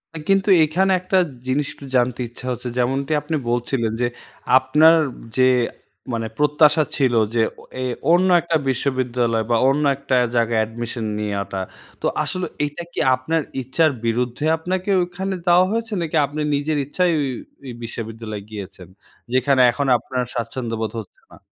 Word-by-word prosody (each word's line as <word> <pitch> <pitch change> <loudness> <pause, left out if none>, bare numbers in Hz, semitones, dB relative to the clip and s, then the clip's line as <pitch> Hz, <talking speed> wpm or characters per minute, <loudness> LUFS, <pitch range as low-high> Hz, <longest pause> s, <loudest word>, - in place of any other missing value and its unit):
আ - - -4
কিন্তু 195 +1 +3
এখানে 180 +5 +2
একটা 185 +1 +1 0.3
জিনিস 140 +3 +1
একটু 140 - -12
জানতে 125 -1 +2
ইচ্ছা 120 +2 -11
হচ্ছে, 125 0 -5
যেমনটি 135 +4 0
আপনি 155 +3 -3
বলছিলেন, 120 -1 0
যে 120 - +3 0.5
আপনার 150 +5 +5 0.4
যে 130 - +5 0.7
মানে 115 -1 -2
প্রত্যাশা 150 +1 +4
ছিল 130 -4 +2 0.2
যে 115 - +2 0.2
ও - - -13 0.2
এ - - -1 0.3
অন্য 180 +2 +4
একটা 170 -1 -1
বিশ্ববিদ্যালয় 125 -3 0
বা 120 - +3
অন্য 145 +2 +1
একটা 135 -1 -1 0.2
জায়গায় 115 -1 +2
অ্যাডমিশন 115 +1 -4
নেয়াটা 100 -2 -3 0.4
তো - - -3 0.2
আসলে 185 0 -3 0.2
এইটা 145 +4 -4
কি - - -4 0.2
আপনার 160 +6 -1 0.2
ইচ্ছার 145 +5 +2
বিরুদ্ধে 120 +4 -1
আপনাকে 185 +4 -3
ওখানে 190 +2 -4
দেওয়া 175 +1 +5
হয়েছে? 225 0 -2
নাকি 165 -1 -3
আপনি 145 +2 -5
নিজের 150 +2 -1
ইচ্ছায় 175 +5 +1
ওই, 140 -2 0 0.3
ওই 130 - -7
বিশ্ববিদ্যালয় 115 -2 -6
গিয়েছেন? 100 -4 -9 0.5
যেখানে 130 +1 +3
এখন 140 +3 -2
আপনার 125 +2 -3
স্বাচ্ছন্দ্যবোধ 115 -2 -3
হচ্ছে 105 - -12
না। - - -14
130 Hz, 155 wpm, -21 LUFS, 120-160 Hz, 0.7 s, আপনার